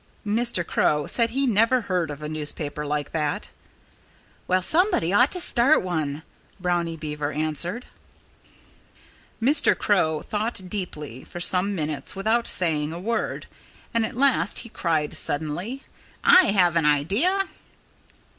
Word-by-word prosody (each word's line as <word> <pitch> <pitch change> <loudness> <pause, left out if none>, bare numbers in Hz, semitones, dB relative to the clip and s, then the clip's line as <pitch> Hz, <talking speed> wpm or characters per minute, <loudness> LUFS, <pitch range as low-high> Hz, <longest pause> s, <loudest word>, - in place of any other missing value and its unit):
Mr. 215 -4 +2
Crow 150 -2 +1
said 230 - +2
he 270 +4 -1
never 230 +2 +3
heard 180 -6 -2
of 145 0 -7
a - - -3
newspaper 150 -1 -4
like 145 0 -3
that. 150 -2 -2 1.0
"Well, 185 0 +1
somebody 315 - +2
ought 245 +7 +4
to 365 - -3
start 275 - +3
one," 160 -4 -3 0.4
Brownie 175 -2 -1
Beaver 150 -1 -4
answered. 155 - -1 1.5
Mr. 285 +5 +5
Crow 160 -7 +1
thought 210 -3 -2
deeply 150 - -5
for 175 - -9
some 185 +3 +2
minutes 155 -3 -1
without 220 +4 0
saying 155 -4 0
a 170 - -6
word. 225 +4 -3 0.5
And 230 -1 +2
at 220 - -4
last 270 -5 +2
He - - -10
cried 160 -7 -1
suddenly: 160 - -3 0.4
"I 370 0 +7
have 180 -4 +3
an 165 -3 +2
idea!" 200 - +2
180 Hz, 135 wpm, -24 LUFS, 155-230 Hz, 1.5 s, I